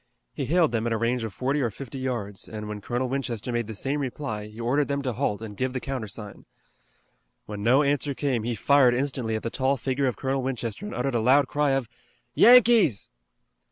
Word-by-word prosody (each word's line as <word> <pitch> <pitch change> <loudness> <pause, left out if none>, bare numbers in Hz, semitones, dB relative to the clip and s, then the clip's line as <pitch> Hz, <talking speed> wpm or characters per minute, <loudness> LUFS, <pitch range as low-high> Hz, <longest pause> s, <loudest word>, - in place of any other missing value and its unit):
He 140 - -3
hailed 165 +2 +3
them 115 -1 -1
at 115 - 0
a - - 0
range 115 +2 0
of 110 - -4
forty 135 +8 -1
or 120 - +1
fifty 135 +4 -8
yards, 115 -7 -4
and 105 -1 -6
when 105 -1 -6
Colonel 120 +5 -2
Winchester 125 -3 -3
made 120 -2 -1
the 110 - -6
same 135 +7 -2
reply 120 -6 -4
he 105 +2 -13
ordered 135 +5 +1
them 140 0 -2
to 130 -3 -1
halt 105 0 -2
and 105 -2 -7
give 130 +4 -2
the 130 - -2
countersign. 110 -6 -6 1.0
When 105 -1 -6
no 125 +7 +4
answer 140 0 0
came 130 -5 0
he 120 +2 -2
fired 135 -1 +4
instantly 130 -4 -1
at 110 - -4
the 115 - -3
tall 135 +1 +1
figure 135 +2 -1
of 125 - -2
Colonel 135 0 -1
Winchester 125 - -4
and - - -6
uttered 125 +2 -1
a 120 - +2
loud 130 +5 +4
cry 145 +1 +1
of, 135 -3 -1 0.5
"Yankees!" 230 - +5
125 Hz, 215 wpm, -26 LUFS, 115-140 Hz, 1.0 s, Yankees